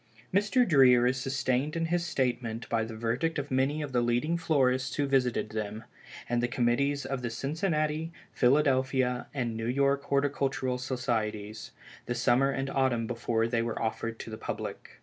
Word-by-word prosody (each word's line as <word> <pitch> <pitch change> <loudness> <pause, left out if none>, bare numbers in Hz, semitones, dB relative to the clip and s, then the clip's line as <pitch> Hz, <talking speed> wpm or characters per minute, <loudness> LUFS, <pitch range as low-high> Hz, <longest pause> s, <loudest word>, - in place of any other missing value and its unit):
Mr. 210 +6 +3
Dreer 130 -6 +6
is 130 +1 +2
sustained 135 +3 -1
in 165 0 0
his 170 +1 0
statement 125 -7 -2
by 115 -1 +1
the 110 0 -6
verdict 120 +9 -1
of 145 -1 -4
many 135 +4 +1
of 145 - -5
the 125 -1 +2
leading 120 +8 +1
florists 130 -6 +1
who 145 - +1
visited 125 -5 +1
them, 110 0 -4 0.4
and 120 0 0
the 120 - +1
committees 130 +4 +1
of 135 -1 -3
the 120 - -2
Cincinnati, 155 - -1 0.2
Philadelphia 130 -2 +2
and 120 -5 -2
New 115 0 -3
York 140 +2 +1
Horticultural 140 -2 0
Societies, 110 -5 -3 0.4
the 120 - -1
summer 130 +3 +3
and 135 0 -2
autumn 130 -4 +1
before 115 -1 -1
they 115 -1 0
were 115 0 -3
offered 115 0 -2
to 115 - -8
the 110 - -7
public. - - -6
130 Hz, 170 wpm, -29 LUFS, 120-140 Hz, 0.4 s, Dreer